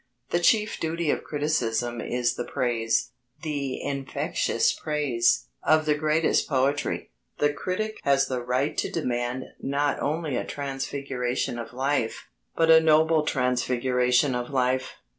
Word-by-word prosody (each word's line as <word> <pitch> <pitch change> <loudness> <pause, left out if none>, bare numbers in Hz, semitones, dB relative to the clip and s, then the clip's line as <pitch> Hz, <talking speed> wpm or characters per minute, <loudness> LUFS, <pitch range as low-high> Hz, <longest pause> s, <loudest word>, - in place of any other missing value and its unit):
The 175 - +2
chief 210 +4 +2
duty 165 -1 0
of - - -2
criticism 120 -6 -1
is 125 0 0
the - - -4
praise 115 -2 0 0.3
the 145 -4 -3
infectious 140 -1 0
praise 135 - +1 0.2
of 155 0 +3
the 150 - +3
greatest 155 +2 +1
poetry. 140 - 0 0.3
The 145 0 +2
critic 215 +8 -3
has 140 -1 +3
the 130 -2 -3
right 125 +4 0
to - - -1
demand 125 -4 -2 0.2
not 145 +1 0
only 155 -2 -1
a - - -1
transfiguration 135 -3 -3
of 115 - -7
life, 130 -1 -1 0.3
but 165 0 +4
a 160 - +9
noble 160 0 +4
transfiguration 125 0 +1
of 125 0 -3
life. 130 -1 0
135 Hz, 135 wpm, -26 LUFS, 125-155 Hz, 0.3 s, a